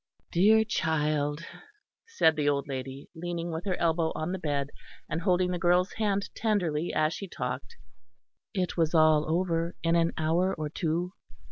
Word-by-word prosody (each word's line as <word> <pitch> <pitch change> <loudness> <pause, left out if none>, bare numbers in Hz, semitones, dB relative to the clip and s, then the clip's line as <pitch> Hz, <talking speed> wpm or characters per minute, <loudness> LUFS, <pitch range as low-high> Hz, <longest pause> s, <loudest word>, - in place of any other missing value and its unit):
"Dear 215 +5 +5
child," 150 -3 0 0.6
said 310 - +3
the 150 -1 +1
old 140 0 0
lady, 135 0 -6
leaning 170 0 -4
with 165 +4 -5
her 190 -2 0
elbow 165 -1 +1
on 155 +3 -2
the 190 - -3
bed, 145 -3 -2 0.4
and 165 - -3
holding 180 -1 +2
the 180 - -2
girl's 180 +2 +3
hand 200 -2 0
tenderly 175 -8 0
as 155 +1 +1
she 195 - -6
talked, 125 -4 -5 0.7
"it 185 -3 -2
was 165 -1 +1
all 155 -1 +4
over 170 0 0
in 165 0 +2
an 165 0 +2
hour 170 +4 +1
or 155 -1 -4
two. 170 +3 -2
165 Hz, 160 wpm, -28 LUFS, 155-180 Hz, 0.7 s, Dear